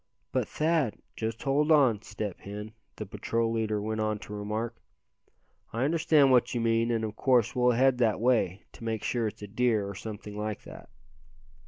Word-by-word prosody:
"But, - - 0
Thad 155 -7 +1
" - - -45
"Just 110 0 -4
hold 145 +3 +2
on, 130 -9 +5
Step 105 -4 -5
Hen," 105 +2 -7 0.2
the 105 - -5
patrol 115 +3 -1
leader 110 -2 0
went 110 +1 -2
on 110 0 0
to 105 - -8
remark, 105 +3 -3 1.0
"I 115 +3 -1
understand 155 -3 +4
what 125 0 +3
you - - +1
mean, 115 0 +2
and 115 -1 0
of 110 -1 -3
course 125 -1 +2
we'll 125 0 +4
head 130 +1 +3
that 115 -4 +2
way, 110 -5 +1
to - - -13
make 110 -1 -2
sure 120 -3 0
it's 105 - -7
a - - -5
deer, 110 -1 +1
or 100 - -5
something 105 +1 -7
like 105 0 -4
that." - - -12
115 Hz, 190 wpm, -29 LUFS, 105-125 Hz, 1.0 s, on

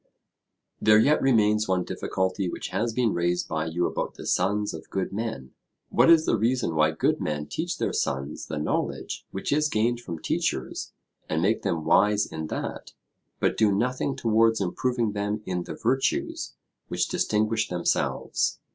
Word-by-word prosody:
There 105 0 +6
yet 145 +8 +4
remains 110 -4 +3
one 95 -1 +1
difficulty 95 +1 -2
which - - -5
has 110 +5 -1
been 115 -1 +1
raised 85 +1 0
by 80 0 -2
you 85 +2 0
about - - -3
the - - -9
sons 100 +3 +1
of - - -9
good 95 0 -2
men. 100 - -4 0.4
What - - +4
is 165 -1 +7
the - - +2
reason 120 -5 +1
why 75 0 +4
good 80 - 0
men 75 -1 -2
teach - - -3
their - - -1
sons 70 +2 -2
the 75 - -4
knowledge 75 - -2
which 95 - -4
is 150 +1 +2
gained 120 0 +1
from 85 -9 -6
teachers, - - -2 0.4
and 80 - 0
make 100 +7 +1
them 80 -2 -2
wise 105 +1 +4
in 80 0 -5
that, - - -5 0.5
but - - +1
do 110 -2 +3
nothing 125 +6 0
towards 115 0 +3
improving 115 +4 0
them 105 +1 -2
in 90 -1 -2
the - - -6
virtues 135 +1 -1 0.3
which - - 0
distinguish 110 +1 +1
themselves? 90 -1 0
105 Hz, 165 wpm, -26 LUFS, 85-115 Hz, 0.5 s, is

